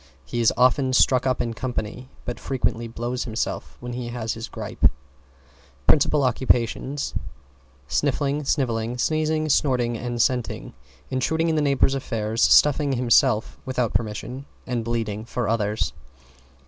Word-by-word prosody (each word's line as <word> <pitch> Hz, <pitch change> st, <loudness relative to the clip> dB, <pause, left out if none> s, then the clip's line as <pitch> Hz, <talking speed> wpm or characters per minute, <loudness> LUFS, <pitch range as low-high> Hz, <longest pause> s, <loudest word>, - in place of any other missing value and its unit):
He 120 Hz, -, -2 dB
is 115 Hz, -, +5 dB
often 130 Hz, +1 st, +3 dB
stuck 130 Hz, 0 st, +4 dB
up 130 Hz, -1 st, +1 dB
in 115 Hz, -1 st, -3 dB
company, 125 Hz, +1 st, -4 dB, 0.2 s
but 120 Hz, -, -4 dB
frequently 120 Hz, -3 st, -1 dB
blows 120 Hz, +2 st, -3 dB
himself 115 Hz, -2 st, -3 dB
when 120 Hz, 0 st, -6 dB
he 120 Hz, 0 st, -4 dB
has 120 Hz, -2 st, -3 dB
his 115 Hz, +1 st, -6 dB
grippe. -, -, +1 dB, 1.0 s
Principal 150 Hz, -1 st, +4 dB
occupations, 130 Hz, +2 st, 0 dB, 0.7 s
sniffling, 145 Hz, -, 0 dB
snivelling, 120 Hz, -4 st, 0 dB
sneezing, 155 Hz, +3 st, +1 dB
snorting 125 Hz, -4 st, +2 dB
and 120 Hz, +1 st, -4 dB
scenting, 125 Hz, -1 st, 0 dB, 0.4 s
intruding 160 Hz, +6 st, +1 dB
in 160 Hz, -, +1 dB
the 155 Hz, -, +2 dB
neighbors' 140 Hz, -2 st, +3 dB
affairs, 115 Hz, -4 st, -2 dB
stuffing 145 Hz, -1 st, +5 dB
himself 115 Hz, -3 st, +2 dB
without 125 Hz, -4 st, -1 dB
permission 120 Hz, +5 st, -3 dB, 0.2 s
and 120 Hz, -3 st, -2 dB
bleeding 110 Hz, -2 st, -2 dB
for 120 Hz, 0 st, -3 dB
others. 110 Hz, -1 st, 0 dB
125 Hz, 135 wpm, -24 LUFS, 115-135 Hz, 1.0 s, is